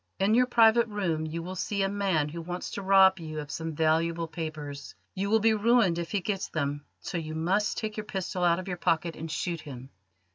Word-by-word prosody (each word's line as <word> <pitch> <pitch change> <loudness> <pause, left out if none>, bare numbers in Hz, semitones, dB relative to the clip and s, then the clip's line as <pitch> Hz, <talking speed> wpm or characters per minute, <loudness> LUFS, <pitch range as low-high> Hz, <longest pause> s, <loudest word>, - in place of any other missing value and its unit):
In 195 +3 +2
your 250 +2 +4
private 235 -1 +5
room 175 -7 -2
you 165 +2 -4
will 180 +2 -6
see 200 +2 -1
a - - +2
man 195 -7 0
who 170 +2 -6
wants 175 +2 -5
to - - -4
rob 190 -1 +5
you 155 -2 -6
of 145 -1 -7
some 160 -1 -4
valuable 165 +2 +1
papers. 155 -4 -6 0.2
You 200 +1 -2
will 220 +1 +4
be 225 +1 +4
ruined 215 -5 +3
if 170 - -4
he 205 - -1
gets 195 +1 -2
them, 145 -2 -2 0.2
so 175 - -3
you 155 -1 -6
must 190 +6 0
take 215 -1 -4
your 215 - -2
pistol 190 -3 -3
out 170 -1 +4
of 185 - -6
your 180 -2 -3
pocket 165 -1 0
and 160 +1 -6
shoot 170 +1 -3
him. 130 -2 -10
175 Hz, 225 wpm, -28 LUFS, 160-200 Hz, 0.2 s, private